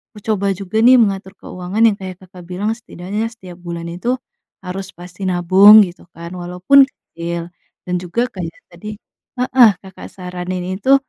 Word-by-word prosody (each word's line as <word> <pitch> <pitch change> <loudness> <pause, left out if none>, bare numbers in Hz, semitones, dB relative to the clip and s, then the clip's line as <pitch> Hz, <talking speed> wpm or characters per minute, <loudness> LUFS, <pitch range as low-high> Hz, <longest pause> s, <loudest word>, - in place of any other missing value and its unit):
aku - - -10
coba 200 -2 0
juga 195 +3 -3
nih 255 +1 +8
mengatur 195 -2 -1
keuangan 185 +4 -5
yang 205 - +1
kayak 185 -1 -7
Kakak 185 -1 -13
bilang 190 +4 -2
setidaknya 210 0 -5
setiap 185 -7 -12
bulan 170 -1 -6
itu, 235 +9 -1 0.5
harus 190 +1 -6
pasti 180 +2 -10
nabung 190 +4 +7
gitu 175 - -13
kan 170 +1 -9
walaupun 180 +10 +4
kecil, 170 -8 -7 0.4
dan 180 - -2
juga 205 +8 -1
kayak 170 -5 -6 0.2
tadi 210 +5 -8 0.5
heeh, 250 -3 +6
Kakak 190 -1 -11
saranin 180 0 -5 0.2
itu 265 +6 +5
185 Hz, 155 wpm, -18 LUFS, 175-210 Hz, 0.5 s, nih